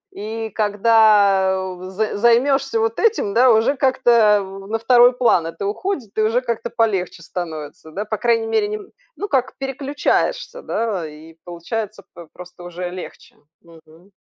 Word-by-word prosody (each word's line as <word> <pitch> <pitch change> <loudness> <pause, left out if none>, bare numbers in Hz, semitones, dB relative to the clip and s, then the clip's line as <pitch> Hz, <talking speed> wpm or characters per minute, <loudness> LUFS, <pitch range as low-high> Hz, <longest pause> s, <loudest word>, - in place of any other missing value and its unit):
и 220 +2 -5
когда 205 -3 +3
з 190 +3 -3
займешься 255 +3 +2
вот 225 0 -1
этим, 435 - +1
да, 250 +1 +6
уже 225 +5 +3
как-то, 260 -2 +1 0.3
э, 195 0 -9
на 225 - -1
второй 245 +2 +5
план 230 -9 +2
это 165 +3 -7
уходит 235 - -4
и - - +2
уже 225 +3 +1
как-то 235 -3 -3
полегче 195 -7 -1
становится, 160 -3 -7
да, 205 +6 -4
по 215 0 -3
крайней 230 -2 +1
мере, 415 - +1
не, 425 - -3
н 410 -2 -14 0.2
ну, 410 - -5
как 265 -6 -1
переключаешься, 280 - -2
да, 200 -8 -2
и 155 +2 -13
получается, 200 +4 -5
п 170 -1 -12
просто 180 0 -12
уже 175 0 -6
легче, 180 0 -10 0.3
мгм. 165 +2 -19
215 Hz, 155 wpm, -20 LUFS, 185-245 Hz, 0.3 s, да